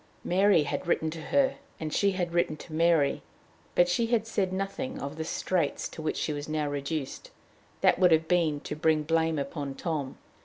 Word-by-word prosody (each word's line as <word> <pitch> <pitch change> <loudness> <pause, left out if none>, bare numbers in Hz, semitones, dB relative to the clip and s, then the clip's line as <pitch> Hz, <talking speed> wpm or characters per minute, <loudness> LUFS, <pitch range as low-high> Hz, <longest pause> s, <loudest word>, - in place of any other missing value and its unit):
Mary 190 -2 +4
had 145 - -3
written 160 -2 +1
to 160 0 -7
her, 270 - +2 0.2
and 155 -1 -4
she 200 -1 +2
had 175 -2 -2
written 170 -3 +1
to 155 - -11
Mary; 160 -3 +3 0.5
but 175 - +5
she 205 +6 +1
had 230 -2 +1
said 200 -4 -1
nothing 195 +7 -3
of 140 +2 -5
the 160 - -3
straits 175 +2 -1
to - - -9
which 155 - -2
she 155 - -1
was 145 +1 -5
reduced; 145 -1 -3 0.5
that - - +4
would 180 -2 +5
have 160 0 +4
been 165 -4 +2
to - - -5
bring 155 0 +2
blame 160 0 +1
upon 140 0 -4
Tom. 145 -4 -3
160 Hz, 190 wpm, -28 LUFS, 150-180 Hz, 0.5 s, but